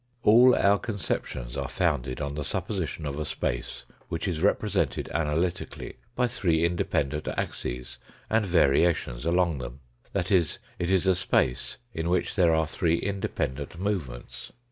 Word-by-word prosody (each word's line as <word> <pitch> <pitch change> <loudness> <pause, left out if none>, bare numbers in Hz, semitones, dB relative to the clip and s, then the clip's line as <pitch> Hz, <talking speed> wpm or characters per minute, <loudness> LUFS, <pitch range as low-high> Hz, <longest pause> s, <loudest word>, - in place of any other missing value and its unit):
All 120 +4 +7
our 100 +1 +4
conceptions 75 - -3
are 70 -1 -2
founded 65 +3 0
on 70 -1 -2
the 75 0 -3
sup - - -2
position - - -3
of 70 +1 -3
a - - 0
space - - -3 0.3
which 85 +3 -2
is 85 -4 -2
represented 100 +1 +1
analytically 85 +3 -2 0.2
by 125 - +3
three 85 -9 +1
independent 75 -4 0
axes 60 +1 -4 0.3
and 110 0 +2
variations 80 -6 +2
along 85 -4 +2
them 60 +2 -7 0.3
that 90 -1 -1
is, 85 -5 +3 0.2
it 85 - -1
is 95 -1 +3
a 95 - +5
space 85 -8 0 0.2
in 80 +1 -2
which 90 - 0
there 90 -4 +5
are 80 0 +2
three 80 +1 +1
independent 85 -6 -3
movements. 90 -12 -4
85 Hz, 150 wpm, -27 LUFS, 70-95 Hz, 0.3 s, All